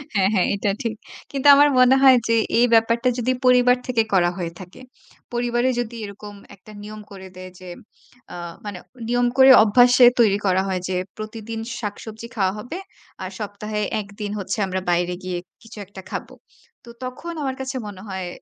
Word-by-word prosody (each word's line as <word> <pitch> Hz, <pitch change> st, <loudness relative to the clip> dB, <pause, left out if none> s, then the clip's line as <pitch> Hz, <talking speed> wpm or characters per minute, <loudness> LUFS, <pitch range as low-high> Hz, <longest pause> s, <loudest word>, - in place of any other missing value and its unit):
হ্যাঁ, 195 Hz, 0 st, +3 dB
হ্যাঁ 185 Hz, -, +2 dB
এটা 200 Hz, 0 st, -1 dB
ঠিক। 230 Hz, -1 st, -2 dB, 0.4 s
কিন্তু 275 Hz, 0 st, 0 dB
আমার 290 Hz, +1 st, +6 dB
মনে 255 Hz, +1 st, +6 dB
হয় 260 Hz, -2 st, +8 dB
যে 230 Hz, -, +4 dB, 0.2 s
এই 245 Hz, -, +6 dB
ব্যাপারটা 230 Hz, +2 st, +3 dB
যদি 250 Hz, +2 st, 0 dB
পরিবার 250 Hz, 0 st, +5 dB
থেকে 235 Hz, -3 st, +2 dB
করা 175 Hz, -2 st, +4 dB
হয়ে 170 Hz, -2 st, -4 dB
থাকে, 185 Hz, +6 st, -12 dB, 0.5 s
পরিবারে 240 Hz, +1 st, 0 dB
যদি 235 Hz, 0 st, -4 dB
এরকম 205 Hz, +1 st, -10 dB, 0.2 s
একটা 195 Hz, +3 st, -17 dB
নিয়ম 215 Hz, 0 st, -9 dB
করে 190 Hz, -1 st, -10 dB
দেয় 185 Hz, 0 st, -10 dB
যে 185 Hz, -1 st, -10 dB, 0.6 s
আ -, -, -7 dB, 0.3 s
মানে 200 Hz, -3 st, -6 dB, 0.3 s
নিয়ম 245 Hz, 0 st, +2 dB
করে 265 Hz, 0 st, +8 dB
অভ্যাসে 245 Hz, +3 st, +6 dB
তৈরি 205 Hz, -4 st, +4 dB
করা 190 Hz, 0 st, +2 dB
হয় 185 Hz, -2 st, -2 dB
যে 185 Hz, -, -1 dB, 0.2 s
প্রতিদিন 220 Hz, +1 st, -7 dB, 0.2 s
শাকসবজি 220 Hz, +2 st, -7 dB
খাওয়া 190 Hz, -3 st, +1 dB
হবে। 275 Hz, -, -7 dB, 0.5 s
আর 185 Hz, -, -5 dB
সপ্তাহে 210 Hz, +1 st, -4 dB, 0.2 s
১ 200 Hz, -, -11 dB
দিন 205 Hz, -1 st, -3 dB
হচ্ছে 195 Hz, -, -3 dB
আমরা 185 Hz, 0 st, -3 dB
বাইরে 175 Hz, +1 st, 0 dB
গিয়ে 180 Hz, -1 st, -3 dB, 0.2 s
কিছু 225 Hz, -1 st, -14 dB
একটা 195 Hz, -1 st, -11 dB
খাবো। -, -, -6 dB, 0.5 s
তো -, -, -13 dB, 0.2 s
তখন 335 Hz, +7 st, -7 dB
আমার 265 Hz, -1 st, -2 dB
কাছে 265 Hz, 0 st, -5 dB
মনে 190 Hz, -2 st, -9 dB
হয় 190 Hz, -2 st, -5 dB
215 Hz, 180 wpm, -22 LUFS, 190-245 Hz, 0.6 s, হয়